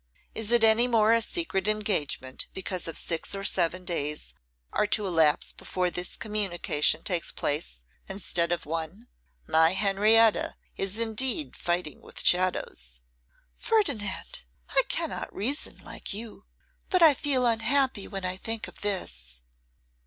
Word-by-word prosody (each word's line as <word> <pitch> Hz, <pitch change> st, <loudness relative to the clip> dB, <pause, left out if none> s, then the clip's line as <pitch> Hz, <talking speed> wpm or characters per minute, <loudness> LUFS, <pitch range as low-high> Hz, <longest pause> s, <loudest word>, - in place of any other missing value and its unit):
Is 225 Hz, 0 st, -2 dB
it 240 Hz, -1 st, +5 dB
any 225 Hz, +2 st, +6 dB
more 225 Hz, -2 st, +3 dB
a 230 Hz, -, +3 dB
secret 220 Hz, -, 0 dB
engagement 195 Hz, -11 st, -1 dB
because 185 Hz, -2 st, -2 dB
six 165 Hz, +3 st, +1 dB
or 195 Hz, -, -5 dB
seven 180 Hz, -1 st, +2 dB
days 150 Hz, -4 st, -3 dB, 0.4 s
are 210 Hz, -, +1 dB
to 210 Hz, -, +1 dB
elapse 165 Hz, -5 st, +3 dB
before 180 Hz, -1 st, -2 dB
this 180 Hz, 0 st, -2 dB
communication 175 Hz, -7 st, 0 dB
takes 175 Hz, -3 st, +2 dB
place, 145 Hz, -, -3 dB, 0.3 s
instead 180 Hz, -3 st, 0 dB
of 175 Hz, -, -2 dB
one? 165 Hz, +9 st, -5 dB, 0.4 s
My 160 Hz, +2 st, +4 dB
Henrietta 210 Hz, +3 st, +3 dB, 0.2 s
is 195 Hz, +2 st, -2 dB
indeed 245 Hz, +7 st, +1 dB
fighting 175 Hz, -4 st, -2 dB
with -, -, -6 dB
shadows!' 120 Hz, -, +1 dB, 0.6 s
'Ferdinand, 280 Hz, -, -1 dB, 0.3 s
I -, -, +4 dB
cannot -, -, -2 dB
reason 265 Hz, +9 st, -1 dB
like -, -, -5 dB
you; 215 Hz, -1 st, -8 dB, 0.4 s
but 365 Hz, -3 st, +3 dB
I 315 Hz, -3 st, +8 dB
feel 270 Hz, -2 st, +1 dB
unhappy 235 Hz, 0 st, +1 dB
when 195 Hz, -2 st, -5 dB
I 185 Hz, 0 st, -3 dB
think 225 Hz, +3 st, -3 dB
of -, -, -11 dB
this. -, -, -4 dB
195 Hz, 135 wpm, -27 LUFS, 170-225 Hz, 0.6 s, I